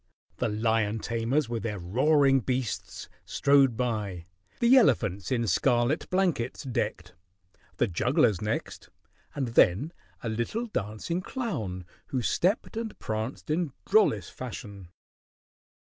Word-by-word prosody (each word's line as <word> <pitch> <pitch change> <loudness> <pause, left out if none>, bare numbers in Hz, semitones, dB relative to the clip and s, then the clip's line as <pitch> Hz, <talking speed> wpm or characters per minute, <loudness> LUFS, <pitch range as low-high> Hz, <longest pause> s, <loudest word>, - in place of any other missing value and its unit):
The - - 0
lion 110 0 +1
tamers 115 +5 0
with 115 -1 -3
their 105 -2 -3
roaring 135 - +3
beasts 125 -2 -3 0.2
strode 140 -4 +3
by, 105 -8 -2 0.3
the 240 +2 +6
elephants 105 - +3
in 120 -2 +1
scarlet 120 - +1
blankets 180 -10 0
decked, 105 -8 -3 0.6
the - - +3
jugglers 90 +2 +2
next, 105 0 -4 0.5
and 135 -4 -1
then 115 - +3 0.3
a - - -3
little 120 - -2
dancing 125 - -3
clown 110 - -4 0.2
who 130 -3 -2
stepped 195 - 0
and 225 -1 -4
pranced 110 +7 -4
in 160 -3 0
drollest 195 - +3
fashion. 105 -6 -8
120 Hz, 115 wpm, -28 LUFS, 105-150 Hz, 0.6 s, the